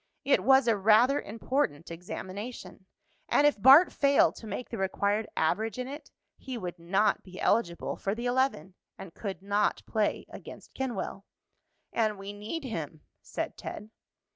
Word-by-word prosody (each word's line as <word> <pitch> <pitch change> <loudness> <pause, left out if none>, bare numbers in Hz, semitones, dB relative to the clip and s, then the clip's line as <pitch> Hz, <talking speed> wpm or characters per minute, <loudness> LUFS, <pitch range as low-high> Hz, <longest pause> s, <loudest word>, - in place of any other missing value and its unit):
It 280 - +3
was 265 -1 +5
a 230 - +4
rather 220 +7 +4
important 210 - -2
examination, 190 +4 -8 0.4
and 290 - +4
if 290 -8 +2
Bart 275 - +8
failed 280 0 +4
to 225 - -10
make 250 - -5
the 230 - -5
required 200 +3 0
average 210 +8 0
in 250 0 -4
it 290 +2 -9 0.3
he 260 -2 -6
would 180 -5 -6
not 190 +5 +1
be 185 -1 -12
eligible 170 -7 0
for 195 +1 -2
the 235 +2 -5
eleven, 245 - 0 0.2
and 180 -4 -10
could 195 -3 -6
not 205 +1 0
play 215 -2 -1
against - - -11
Kenwell. 235 -6 -4 0.7
"And 215 -2 +1
we 195 +1 -7
need 215 +11 -5
him," 160 - -5 0.2
said - - -5
Ted. 210 +1 -8
215 Hz, 155 wpm, -29 LUFS, 195-255 Hz, 0.7 s, Bart